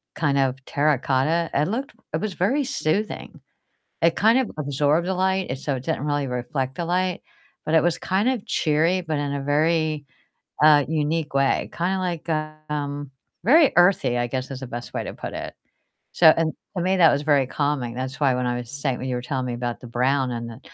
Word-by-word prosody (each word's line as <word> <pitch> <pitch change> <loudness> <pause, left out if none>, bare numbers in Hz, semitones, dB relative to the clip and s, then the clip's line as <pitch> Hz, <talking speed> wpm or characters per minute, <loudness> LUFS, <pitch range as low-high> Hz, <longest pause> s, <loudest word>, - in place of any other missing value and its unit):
kind 145 -3 +1
of 130 -1 +1
terracotta, 150 +3 +1
it 145 +2 +2
looked 260 +7 -3 0.2
it - - -1
was 215 -3 -2
very 260 +11 +1
soothing. 210 - -2 0.6
It 165 0 +4
kind 225 +4 +4
of 260 - -1
absorbed 145 +4 +1
the 190 - 0
light, 190 0 +1
it 130 - -3
so 140 0 -2
it 125 - -8
didn't 145 - -2
really 145 -2 0
reflect 130 +2 -3
the 170 - -3
light, 180 +1 0 0.4
but 155 - -1
it 160 - +6
was 175 -1 +1
kind 195 +6 +1
of 250 -6 -2
cheery, 165 +4 +1
but 160 -3 -2
in 145 -1 -2
a 140 - -2
very, 155 0 +1 0.6
uh, 150 -2 +7
unique 155 0 -1
way, 140 0 +1
kinda 185 +3 -1
like, 175 -3 -3 0.4
um, 145 -1 -3 0.3
very 295 +5 +6
earthy, 175 -9 +4
I 120 - 0
guess, 130 +2 -4
is 135 -1 -6
the 130 - -6
best 120 0 -7
way - - -2
to - - -6
put - - -7
it. - - -6 0.6
So 165 - +6
and 160 -1 +1 0.2
to 180 - 0
me, 185 +2 +2
that 165 -3 +7
was 145 - 0
very 145 -3 +3
calming, 135 -3 -1
that's 130 +2 -5
why 135 -3 +3
when 125 0 -1
I 120 0 0
was 120 -1 -7
say 140 -2 -2
when 130 - -5
you 125 - -1
were 125 - -4
telling 130 0 -3
me 125 - -3
about 120 0 -4
the - - -10
brown 130 +2 +1
and 115 0 -5
the 115 +2 -11
150 Hz, 215 wpm, -23 LUFS, 130-170 Hz, 0.6 s, uh